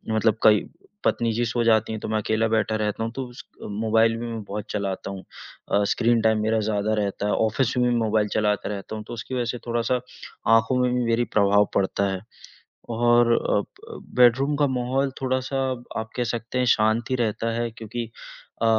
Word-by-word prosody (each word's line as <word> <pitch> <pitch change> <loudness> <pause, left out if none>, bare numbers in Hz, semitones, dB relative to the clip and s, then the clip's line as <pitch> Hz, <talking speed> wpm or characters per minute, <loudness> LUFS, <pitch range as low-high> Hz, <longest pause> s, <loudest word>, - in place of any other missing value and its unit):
मतलब 110 0 +2
कई 105 -1 +5 0.4
पत्नी 115 -1 +1
जी 120 +2 0
सो 120 +1 0
जाती 110 -1 +3
हैं, 110 - -4
तो - - -4
मैं 110 - +1
अकेला 110 +1 +1
बैठा 110 0 +1
रहता 105 0 -1
हूँ, 115 - -3
तो 135 - -3
उस 120 - -11 0.2
क - - -9
मोबाइल 110 +2 +2
भी 120 - -5
मैं 115 -1 -5
बहुत 100 +1 -5
चलाता 100 -1 -3
हूँ। 95 -1 -7 0.5
अ, 100 - +3
स्क्रीन 115 +1 +2
टाइम 110 -1 +2
मेरा 110 +1 +2
ज़्यादा 105 0 0
रहता 100 -1 -2
है, 105 - +1
ऑफ़िस 110 +3 +1
में 125 0 +3
भी 120 - +1
मोबाइल 110 -2 +1
चलाता 105 -2 0
रहता 100 +1 -5
हूँ। 110 - -6
तो - - -7
उसकी 120 +2 -6
वजह 125 -1 0
से 120 +1 -3
थोड़ा-सा 120 +1 0 0.6
आँखों 115 +3 +2
में 125 0 +1
भी 125 - +1
मेरी 115 +1 +2
प्रभाव 105 0 +4
पड़ता 100 0 +1
है 95 - -3 0.7
और 120 0 +4
अ - - +3 0.6
अ, - - -7 0.2
बेडरूम 125 +4 +4
का 145 0 +3
माहौल 130 +1 0
थोड़ा-सा, 130 +1 -1 0.4
आप 110 - -5
कह 125 - +1
सकते 120 +2 -4
हैं, 125 - +2
शांत 110 +1 +1
ही - - +3
रहता 115 -1 -1
है, 120 0 -1
क्योंकि 115 +1 -6 0.5
अ, - - +2
115 Hz, 210 wpm, -24 LUFS, 110-120 Hz, 0.7 s, कई